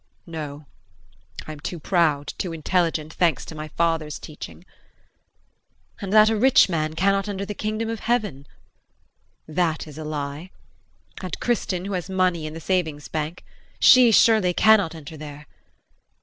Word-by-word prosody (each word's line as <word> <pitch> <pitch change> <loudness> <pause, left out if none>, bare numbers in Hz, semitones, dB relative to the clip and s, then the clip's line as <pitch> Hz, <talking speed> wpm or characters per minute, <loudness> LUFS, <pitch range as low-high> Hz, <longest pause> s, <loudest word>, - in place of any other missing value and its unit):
No, 150 -3 -7 0.8
I - - -7
am 155 - -9
too 170 +3 -5
proud, 155 -4 +1
too 175 -3 -3
intelligent, 160 -1 -1
thanks 170 -3 +1
to - - -9
my 155 0 -6
father's 160 -1 -1
teaching. 155 +3 -10 1.4
And 195 -2 -4
that 215 +1 +6
a - - +1
rich 260 +5 +5
man 155 -3 -2
cannot 195 +3 +1
enter 200 -1 -3
the 210 - -5
Kingdom 215 +2 -3
of 225 -1 -4
Heaven 210 - -1 1.0
that 160 0 -1
is 155 -1 -11
a - - -5
lie, 150 +2 -5 0.7
and 185 -3 -5
Kristin, 190 -6 -1
who 200 - -4
has 180 0 -3
money 180 -4 0
in 155 - -8
the - - -6
savings 160 -4 -2
bank 155 +2 -4 0.3
she 255 -2 +7
surely 215 -5 +4
cannot 210 -7 +4
enter 155 0 -10
there. 150 0 -9
170 Hz, 150 wpm, -23 LUFS, 155-195 Hz, 1.4 s, she